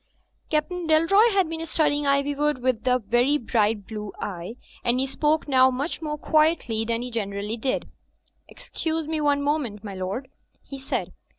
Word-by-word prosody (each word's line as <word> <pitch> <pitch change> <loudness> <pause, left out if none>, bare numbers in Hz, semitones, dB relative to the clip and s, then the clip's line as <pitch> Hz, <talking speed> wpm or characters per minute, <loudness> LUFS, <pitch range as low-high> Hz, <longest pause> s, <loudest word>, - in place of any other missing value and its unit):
Captain 330 +3 -1
Dalroy 335 +9 +5
had 385 -4 +2
been 325 0 -4
studying 295 -3 +1
Iv3rwood 280 0 +1
with 255 -1 -1
a 250 0 +4
very 245 +6 +2
bright 220 -5 0
blue 210 -1 -6
eye; 185 +2 -5 0.3
and 240 +1 +1
he 265 - +1
spoke 300 +4 0
now 260 -2 +5
much 275 +7 -3
more 300 -1 -3
quietly 305 -8 +2
than 230 +1 -1
he 250 - -6
generally 205 -1 -3
did, 255 +3 -2 0.6
"Excuse 320 -1 -4
me 315 -1 -1
one 285 -1 +2
moment, 275 -9 -1
my 205 -2 -6
lord," 190 +8 -4 0.3
he 275 - -9
said. 265 - -3
270 Hz, 165 wpm, -25 LUFS, 225-305 Hz, 0.6 s, Dalroy